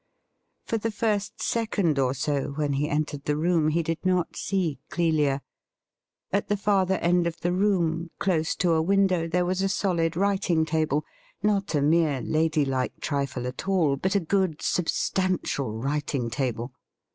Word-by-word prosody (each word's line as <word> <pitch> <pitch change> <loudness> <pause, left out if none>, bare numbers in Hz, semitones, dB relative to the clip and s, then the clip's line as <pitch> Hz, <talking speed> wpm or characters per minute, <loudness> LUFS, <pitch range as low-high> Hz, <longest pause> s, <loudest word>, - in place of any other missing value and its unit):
For 225 - -1
the 225 - -1
first 210 -1 -1
second 200 -10 0
or 130 0 +1
so 140 0 -1
when 145 -1 -1
he 145 +2 0
entered 145 -1 -2
the 150 0 0
room 165 -1 +2
he 165 +2 +1
did 165 0 -3
not 180 -2 +1
see 175 -8 -1
Clelia. 150 -5 +1 0.9
At 200 - +1
the 205 - +1
farther 195 -2 +2
end 175 0 +2
of 170 - -5
the 175 - 0
room, 175 -4 +1
close 165 -5 0
to 180 -2 +1
a 160 -1 +3
window, 185 -1 +2
there 175 +2 +1
was 185 +1 0
a 195 - +1
solid 170 -5 0
writing 190 -4 +2
table 155 -2 0 0.2
— - - -33
^not 200 -5 +1
a 145 - +2
mere 155 -2 +3
lady 155 +2 +1
like 130 -2 -2
trifle 140 -4 -2
at 125 +8 -6
all, 170 -8 +2
but 190 +8 -1
a - - +5
good 185 -2 0
substantial 180 - 0
writing 135 -1 -2
table. 125 -2 -2
165 Hz, 170 wpm, -26 LUFS, 145-190 Hz, 0.9 s, a